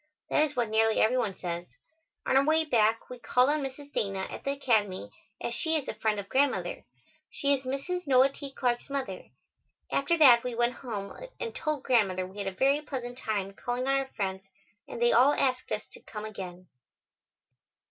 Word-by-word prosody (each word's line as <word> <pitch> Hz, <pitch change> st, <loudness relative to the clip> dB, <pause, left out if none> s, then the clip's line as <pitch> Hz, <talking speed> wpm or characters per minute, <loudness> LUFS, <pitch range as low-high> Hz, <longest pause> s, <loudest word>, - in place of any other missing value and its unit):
That 305 Hz, -, +4 dB
is 295 Hz, -, -13 dB
what 235 Hz, -3 st, 0 dB
nearly 220 Hz, 0 st, +3 dB
every 250 Hz, +4 st, +3 dB
one 210 Hz, -6 st, -1 dB
says. 175 Hz, -1 st, -4 dB, 0.6 s
On -, -, +1 dB
our 270 Hz, -, +6 dB
way 315 Hz, +2 st, +3 dB
back, 225 Hz, -5 st, +2 dB
we 250 Hz, -1 st, -9 dB
called 250 Hz, +3 st, +3 dB
on 305 Hz, 0 st, 0 dB
Mrs. 280 Hz, +1 st, -7 dB
Dana 195 Hz, -2 st, -1 dB
at -, -, -7 dB
the -, -, -2 dB
Academy, 210 Hz, -, 0 dB, 0.3 s
as 235 Hz, -, -3 dB
she 320 Hz, +6 st, 0 dB
is 295 Hz, -4 st, -1 dB
a -, -, -3 dB
friend 215 Hz, -2 st, 0 dB
of 200 Hz, -, -6 dB
Grandmother. 275 Hz, +3 st, 0 dB, 0.4 s
She 280 Hz, -1 st, +1 dB
is 265 Hz, -1 st, -2 dB
Mrs. 300 Hz, +7 st, -3 dB
Noah 260 Hz, 0 st, +6 dB
T. 275 Hz, 0 st, -9 dB
Clarke's 245 Hz, -1 st, -1 dB
mother. 265 Hz, -10 st, -4 dB, 0.7 s
After 285 Hz, +5 st, +2 dB
that, 250 Hz, -7 st, +7 dB
we 250 Hz, -1 st, -3 dB
went 240 Hz, +1 st, +2 dB
home 210 Hz, -6 st, -6 dB, 0.2 s
and 460 Hz, -, -4 dB
told 305 Hz, -3 st, -2 dB
Grandmother 195 Hz, -7 st, +2 dB
we 190 Hz, +3 st, -10 dB
had 200 Hz, -, -3 dB
a -, -, -1 dB
very 275 Hz, +9 st, +2 dB
pleasant 250 Hz, -5 st, -5 dB
time 205 Hz, -6 st, -3 dB
calling 245 Hz, +5 st, -3 dB
on 270 Hz, -, +3 dB
our 270 Hz, -1 st, 0 dB
friends 190 Hz, -2 st, -2 dB, 0.4 s
and -, -, -7 dB
they 240 Hz, 0 st, +4 dB
all 260 Hz, +5 st, +6 dB
asked 255 Hz, -2 st, 0 dB
us 215 Hz, -, -2 dB
to -, -, -12 dB
come 210 Hz, 0 st, -7 dB
again. 185 Hz, -4 st, -8 dB
245 Hz, 200 wpm, -29 LUFS, 210-275 Hz, 0.7 s, that